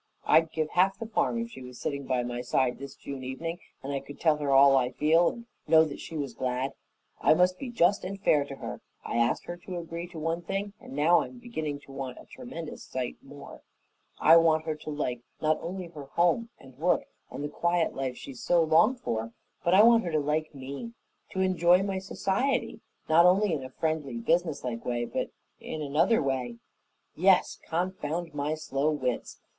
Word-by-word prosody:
I'd 160 0 +4
give 155 -1 -2
half 190 +2 +3
the 225 - -5
farm 225 +1 0
if 230 0 -3
she 130 - -10
was 125 -1 -10
sitting 140 -2 -3
by 125 -2 +1
my 120 0 -4
side 125 0 0
this 140 0 -8
June 135 -2 -7
evening 165 +7 -4 0.2
and 140 +1 -3
I 140 - 0
could 145 +1 -12
tell 155 -2 +3
her 145 -2 -2
all 135 0 +7
I 125 -2 +3
feel 165 +3 +4
and 235 -1 -9 0.2
know 160 0 +6
she 160 - -7
was 140 -3 -3
glad. 130 +1 -2 0.5
I - - +5
must 180 +1 +3
be 265 - -5
just 200 -4 +2
and 195 +2 -5
fair 150 -6 +3
to 140 - -8
her. - - -7 0.2
I - - -2
asked 120 0 +1
her 175 - -6
to 180 +1 -7
agree 170 0 -5
to 175 -1 -11
one 165 +2 -2
thing 195 +3 -3
and - - -11
now 160 +4 +4
I'm 250 - -7
beginning 160 -13 -4
to 140 - -15
want 135 -2 -6
a - - -13
tremendous 205 -11 -8
sight 125 -2 -4
more 140 +1 -12 0.6
I 165 +2 +7
want 160 -1 +3
her 160 - -1
to 155 0 -9
like 125 -5 -2 0.2
not 155 0 +1
only 185 +2 -5
her 150 -4 -9
home 175 +10 +1
and 135 -1 -17
work 175 +3 +2 0.2
and 145 - -6
the - - -1
quiet 170 +2 0
life 130 -2 -3
she 135 - -8
so 170 +7 +2
longed 165 +11 +4
for, 115 - -3 0.3
but 175 +2 +4
I 205 - +8
want 230 0 +6
her 170 - -2
to 155 - +3
like 150 +1 -1
me, 140 - -7 0.4
to 190 - -2
enjoy 180 0 +4
my 195 -1 -2
society, 195 +7 -1 0.3
not 170 +2 +6
only 190 +1 +3
in 145 -4 -2
a 130 - -7
friendly, 150 -3 -2
businesslike 130 -3 0
way, 120 -1 -1
but - - -3 0.3
in 155 - -5
another 155 +9 +2
way 130 -3 -2 0.6
yes, - - +3
confound 170 -1 -2
my 145 +1 -1
slow 150 -1 -1
wits! 130 -5 -2
155 Hz, 205 wpm, -28 LUFS, 135-175 Hz, 0.6 s, I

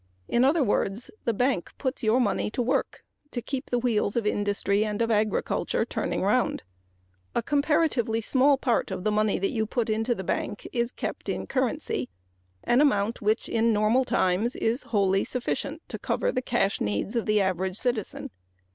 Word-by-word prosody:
In 240 - +2
other 290 +3 +4
words, 205 0 -1
the 235 - +3
bank 245 -5 0
puts 260 -2 -2
your 225 +1 +3
money 220 -4 +1
to 230 - -2
work 250 - -1 0.3
to 245 - -4
keep 260 +3 -5
the 245 - +1
wheels 230 -4 0
of 235 -3 0
industry 205 0 +1
and 210 -1 -3
of 230 0 +1
agriculture 215 -1 0
turning - - -2
around. - - +1 0.7
A - - +1
comparatively 285 -5 +1
small 270 +5 +3
part 250 -3 0
of 180 - -4
the 215 - +1
money 215 0 +2
you 220 0 -1
put 230 -1 -1
into 225 +3 0
the 190 - -5
bank 205 - -3
is 235 -1 0
kept - - -5
in - - -2
currency 255 - -1 0.5
an 240 +3 +3
amount 220 -5 +2
which 215 +2 +1
in 230 0 +2
normal 215 +5 +3
times 205 +1 +1
is 235 +5 0
wholly 195 -3 +2
sufficient 280 +5 -3
to - - -5
cover - - 0
the 255 - -1
cash 220 -6 0
needs 105 - -1
of 230 - -1
the 215 0 +3
average 190 0 0
citizen. 240 -4 -2
225 Hz, 175 wpm, -26 LUFS, 205-255 Hz, 0.7 s, other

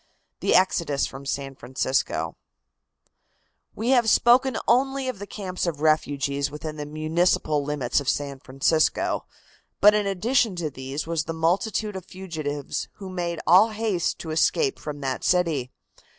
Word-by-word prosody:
THE - - +2
EXODUS 170 -6 +2
FROM 135 +1 -8
SAN 135 0 -3
FRANCISCO. 130 +1 -1 1.4
We 225 +3 -2
have 240 -4 +4
spoken 250 +3 +4
only 270 +2 +2
of 255 -6 -4
the 205 - -7
camps 185 -4 -4
of 160 -4 -2
refugees 145 -2 +1
within 150 +1 -7
the 145 -1 -5
municipal 155 -1 +1
limits 140 -4 0
of 140 - -2
San 140 -2 -2
Francisco. 135 +5 0 0.5
But 210 +1 +7
in 210 -1 +1
addition 220 +2 +1
to 165 -4 -3
these 135 +2 -5
was 165 -1 -1
the 165 - -4
multitude 195 +6 0
of 190 - -6
fugitives 155 -7 -5
who 195 -2 -9
made 170 -2 -3
all 190 +7 +6
haste 215 -5 -1
to 160 - -6
escape 400 - +1
from 145 -1 -6
that 130 -2 -3
city. 165 -8 +1
165 Hz, 150 wpm, -25 LUFS, 145-205 Hz, 1.4 s, But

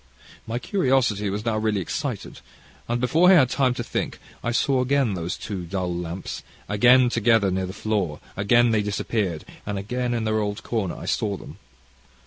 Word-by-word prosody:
"My 115 +1 -2
curiosity 125 - +1
was 105 +3 -3
now 110 -2 +1
really 110 -2 0
excited, 90 - -4 0.5
and, 120 +1 0
before 160 +9 +4
I 190 - +8
had 130 -7 +5
time 130 -3 +2
to - - -3
think, - - -3 0.3
I 120 - 0
saw 130 +2 +2
again 130 -3 +2
these 90 +1 -3
two 100 -4 -5
dull 90 -1 -2
lamps, 85 +1 -5 0.3
again 125 +5 +5
together 115 -4 +3
near 95 0 -1
the - - -5
floor; 100 -7 -2 0.2
again 120 +4 +4
they 110 -2 +3
disappeared, 100 -4 -2 0.2
and 105 -1 -3
again 120 +5 -2
in 115 - -1
their 110 0 +1
old 105 0 -3
corner 105 -7 -2
I - - -8
saw 100 -2 -1
them. - - -12
110 Hz, 180 wpm, -24 LUFS, 100-120 Hz, 0.5 s, I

